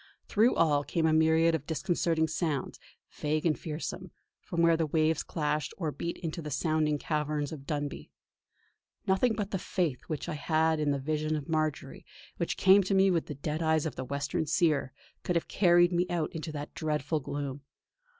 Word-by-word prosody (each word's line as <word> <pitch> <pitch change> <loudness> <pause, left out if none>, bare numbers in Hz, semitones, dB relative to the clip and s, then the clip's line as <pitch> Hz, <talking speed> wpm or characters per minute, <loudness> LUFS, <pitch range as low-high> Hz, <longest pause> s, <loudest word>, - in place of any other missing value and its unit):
Through 225 +3 +3
all 150 -3 +3
came 165 +2 -1
a 160 - +3
myriad 160 +1 +4
of 150 -3 -2
disconcerting 165 0 0
sounds, 160 -3 -2 0.3
vague 155 +2 -2
and 160 -3 +3
fearsome, 170 +3 -5 0.3
from 170 -1 -2
where 170 0 +5
the 160 -1 0
waves 155 +1 +2
clashed 150 -2 -2
or 160 -5 -2
beat 170 +4 -4
into 170 0 -5
the 150 - -6
sounding 155 +1 +1
caverns 150 -1 -2
of 140 -3 -9
Dunbuy. 145 -1 -4 1.0
Nothing 195 +5 +2
but 205 -2 -3
the 190 - -1
faith 170 -8 -1
which 155 -4 -4
I - - -3
had 160 +1 +1
in 150 -1 +1
the 140 - +1
vision 155 +2 -1
of 150 -2 -5
Marjory, 155 -4 -2 0.3
which 170 - -2
came 195 +1 +6
to 195 - +1
me 195 0 +5
with 170 -3 0
the 150 - -5
dead 150 +3 -3
eyes 160 -1 +2
of 160 - -3
the 130 - -4
western 140 +3 -2
Seer, 155 -4 +2 0.3
could 180 - -2
have 170 - 0
carried 175 -2 +4
me 175 +1 +1
out 170 -3 -1
into 160 0 -5
that 145 -1 -6
dreadful 155 0 -1
gloom. 145 0 -5
155 Hz, 190 wpm, -30 LUFS, 150-170 Hz, 1.0 s, came